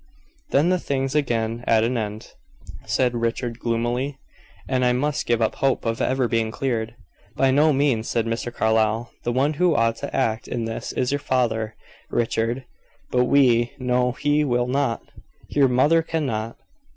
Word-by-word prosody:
"Then 150 +5 +3
the 185 0 +2
thing's 135 -3 -2
again 120 -5 0
at 110 -1 +4
an 120 +3 0
end," 110 -2 -4 0.6
said 125 -1 +1
Richard, 115 0 -2
gloomily, 120 +4 -1 0.5
"and 130 -1 +1
I 125 0 +3
must 150 +3 -1
give 115 -1 +2
up 110 - +1
hope 135 -2 +1
of 115 0 -1
ever 130 -1 +1
being 115 -1 0
cleared." 115 -2 -2 0.4
"By 135 -1 +3
no 150 +3 +4
means," 135 -5 +1
said 115 -1 0
Mr. 115 +1 -3
Carlyle. 110 0 +1
"The 120 - -1
one 135 +5 +1
who 175 -3 +4
ought 115 -2 +2
to - - -6
act 115 -4 0
in 120 -2 -3
this 115 0 -4
is 125 +1 -1
your 145 - 0
father, 115 -5 -1 0.3
Richard; 120 +2 -1 0.5
but 125 0 +3
we 125 -3 +3
know 125 -1 +1
he 145 +2 +1
will 120 -3 +1
not. 125 -2 -1 0.5
Your 140 -2 +4
mother 145 +6 +4
cannot. 130 -9 -3
125 Hz, 165 wpm, -23 LUFS, 115-135 Hz, 0.6 s, at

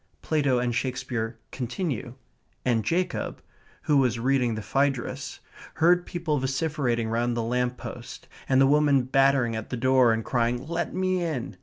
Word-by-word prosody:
Plato 145 -5 +1
and 120 -1 0
Shakespeare 125 -3 -3
continue; 125 - -4 0.5
and 115 -3 +2
Jacob, 180 - -1 0.4
who 150 - +3
was 125 -4 +2
reading 125 -1 +1
the 110 - -5
Phaedrus, 130 +2 -1 0.3
heard 175 +2 +3
people 165 -4 -1
vociferating 130 -3 -1
round 120 +1 0
the 115 - 0
lamp 125 +2 -1
post, - - -9 0.2
and 130 0 +4
the 135 - +6
woman 145 -1 +4
battering 135 -2 +2
at 110 0 -5
the 125 - -3
door 130 -1 +4
and 110 0 -1
crying, 120 +1 0
"Let 170 +1 -2
me 185 -1 0
in!" 125 - -3
130 Hz, 155 wpm, -26 LUFS, 120-145 Hz, 0.5 s, the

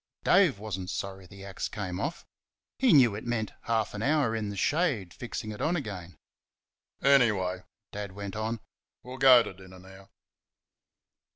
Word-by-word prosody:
Dave 180 - +4
was 105 -2 -5
n't 90 -1 -6
sorry 95 -1 -5
the 100 +1 -12
axe 100 - -4
came 95 -4 -5
off 155 - -4 0.5
he 265 - +4
knew 130 - +6
it 105 - -6
meant 115 -3 -2
half 110 -2 0
an 105 - -5
hour 135 -3 +2
in 110 -2 -2
the 100 - -6
shade 135 - 0
fixing 115 -2 -6
it 105 - -8
on 170 - +1
again. 100 - -6 0.9
"Anyway," 105 -10 +3 0.3
Dad 100 -2 -6
went 100 0 -6
on, 110 +1 -3 0.4
"we'll 130 +1 -9
go 130 -3 +8
to - - -7
dinner 95 0 -14
now." 95 +1 -15
105 Hz, 165 wpm, -28 LUFS, 95-125 Hz, 0.9 s, go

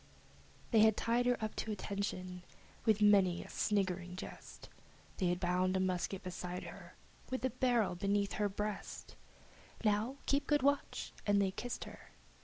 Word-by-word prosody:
They 225 - +6
had 220 0 +6
bound 240 +3 +1
her 245 - +4
up 215 - -1
at - - -4
attention, 200 -3 -3 0.4
with 215 -2 +4
many 195 -4 +5
a - - -13
sniggering 185 -3 0
jest! - - -9 0.5
They 185 - +1
had 175 0 +1
tied 185 +1 +2
a - - +1
rifle 185 +1 0
beside 180 -1 -5
her, - - -10 0.3
with 260 - -2
the 260 - +1
barrel 240 -5 +2
beneath 200 +2 0
her 205 - +3
breast! 210 +1 -5 0.7
"Now 215 +5 +2
keep 280 +1 +1
good 295 -3 +3
watch!" 285 0 0
and 205 0 +4
they 195 -1 +2
kissed 245 +5 -4
her. - - -12
200 Hz, 160 wpm, -35 LUFS, 185-225 Hz, 0.7 s, They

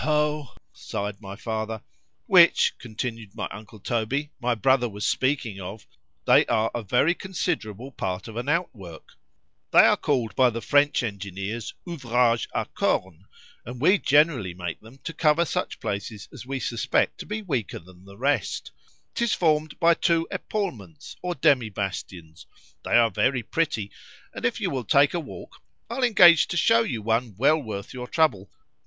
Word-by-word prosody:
ho! 150 -2 0 0.2
sigh'd 100 0 -5
my 100 -1 -8
father) 110 0 -4 0.4
which, 175 -3 +5
continued 115 -2 -6
my - - -3
uncle 110 +1 -11
Toby, 125 +7 -2
my 120 0 +1
brother 125 +2 +2
was 105 0 -5
speaking 130 -7 0
of, 95 +4 -8 0.4
they - - +6
are 115 -1 +1
a 120 - -3
very 125 - +2
considerable 145 - -4
part 95 -5 -4
of 110 - -9
an 120 +4 -3
outwork;——they 105 - -6
are - - +5
called 120 -8 -1
by 130 -1 +5
the 115 0 -4
French 145 +2 +2
engineers, 100 +1 -5
Ouvrage 120 -7 +1
à - - 0
corne, 95 0 -1 0.4
and 125 +1 -8
we 185 +9 +4
generally 140 - +2
make 90 -2 -5
them 115 +5 -15
to 165 - -5
cover 160 +1 +3
such - - -3
places 100 +1 -5
as - - -10
we 135 0 -3
suspect 115 -2 0
to - - -8
be 215 +1 -4
weaker 130 - -3
than 90 +1 -16
the 100 0 -14
rest;—'tis 145 - -2
formed 155 -2 0
by 170 -1 +5
two 165 -1 +1
epaulments 100 - -5
or 180 -1 -3
demi 125 -4 +3
bastions—they 95 -5 -8
are 115 -1 +4
very 125 +5 +1
pretty,—and 115 -9 -4
if 120 - 0
you - - -1
will 130 -3 -2
take 140 +6 +4
a 175 - 0
walk, 150 - -10 0.3
I'll 255 +2 -2
engage 175 -9 +7
to 175 - -3
shew 225 +7 +4
you 115 - -4
one 115 -1 0
well 150 +6 +3
worth 105 -5 -7
your 125 -1 -6
trouble. 110 - +1
120 Hz, 160 wpm, -25 LUFS, 105-150 Hz, 0.4 s, engage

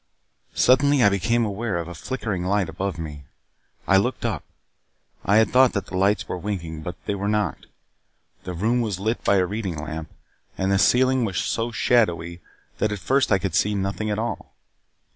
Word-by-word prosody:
Suddenly 140 +1 +4
I 100 - +7
became 115 +4 +1
aware 105 -1 -2
of 85 -1 -4
a 85 - -7
flickering 105 0 -4
light 100 +1 0
above 95 -1 -3
me. 75 -4 -7 0.6
I 95 - +5
looked 120 +5 0
up. 105 -11 -2 0.8
I 100 - +2
had 110 -2 +4
thought 130 0 +5
that 100 -3 -2
the 95 - -8
lights 100 +3 +2
were 90 - -4
winking, 85 -5 -4
but 90 +3 -6
they - - -1
were 100 0 -3
not. 105 -1 -1 0.8
The 90 - -5
room 115 +7 +1
was 105 -5 -2
lit 110 +4 -2
by 100 - +3
a 95 -2 +3
reading 100 -4 -4
lamp, 80 +1 -6 0.5
and 95 +1 0
the 100 - +3
ceiling 130 +2 +4
was 100 -5 -2
so 115 +1 -1
shadowy 85 -8 +1 0.4
that 105 - +1
at 105 - -2
first 135 +6 +1
I 95 - +5
could 95 -2 -3
see 105 +5 +2
nothing 100 +2 -2
at 105 - -1
all. 115 +2 -4
100 Hz, 190 wpm, -23 LUFS, 90-115 Hz, 0.8 s, I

